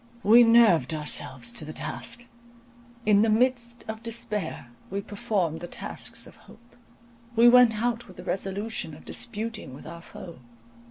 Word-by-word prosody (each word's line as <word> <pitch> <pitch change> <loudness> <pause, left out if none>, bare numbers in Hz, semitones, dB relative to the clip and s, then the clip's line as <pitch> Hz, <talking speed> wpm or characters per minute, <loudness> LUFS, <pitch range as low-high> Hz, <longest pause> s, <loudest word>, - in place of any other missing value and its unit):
We 230 +4 +8
nerved 220 - +5
ourselves 130 -5 -3
to 155 - -3
the 155 - -7
task: 125 - -3 0.8
"in 205 -1 +5
the 225 - +3
midst 240 +1 +1
of 220 0 -5
despair 210 - -4 0.2
we 195 - -2
performed 200 -6 -2
the 175 - -7
tasks - - -5
of - - -15
hope." 235 +1 -18 0.6
We 230 +1 +7
went 240 -3 +6
out 240 -1 -1
with 185 - -14
the - - -9
resolution 195 -3 -3
of 155 - -15
disputing 225 - -4
with - - -12
our 170 +1 -9
foe. 170 -3 -11
210 Hz, 155 wpm, -26 LUFS, 170-235 Hz, 0.8 s, We